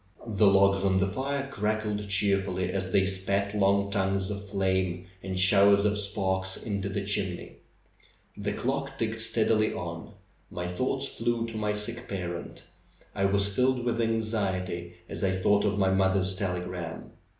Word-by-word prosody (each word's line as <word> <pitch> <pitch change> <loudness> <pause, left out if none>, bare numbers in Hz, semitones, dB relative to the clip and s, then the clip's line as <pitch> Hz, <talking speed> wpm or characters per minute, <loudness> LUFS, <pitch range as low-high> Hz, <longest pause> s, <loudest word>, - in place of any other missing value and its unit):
The 105 -2 +3
logs 100 0 +4
on 95 -1 +2
the 95 - +3
fire 135 +7 -2
crackled 105 -2 -2
cheerfully 100 -2 +2
as 95 0 -2
they 95 +1 +4
spat 100 +1 -1
long 100 0 +2
tongues 95 -1 0
of 100 0 -6
flame 95 -2 0 0.2
and 95 -1 -3
showers 100 +1 +6
of 105 0 +2
sparks 95 -2 -1
into 100 -3 -3
the 100 0 -3
chimney. 95 -3 -1 0.8
The 105 0 -3
clock 135 +1 -3
ticked 110 -1 -2
steadily 110 -1 +2
on. 85 -2 -6 0.4
My 90 - -5
thoughts 90 0 -1
flew 120 -1 -1
to 115 -1 -5
my 105 -1 -1
sick 115 +4 -2
parent. 90 -3 -5 0.5
I 100 - 0
was 100 0 +2
filled 125 +2 +1
with 120 -1 0
anxiety 95 -6 -2
as - - -5
I 95 -1 +2
thought 100 +2 +2
of 105 0 0
my 95 -1 +2
mother's 95 0 +2
telegram. 90 -3 -4
100 Hz, 155 wpm, -28 LUFS, 95-105 Hz, 0.8 s, showers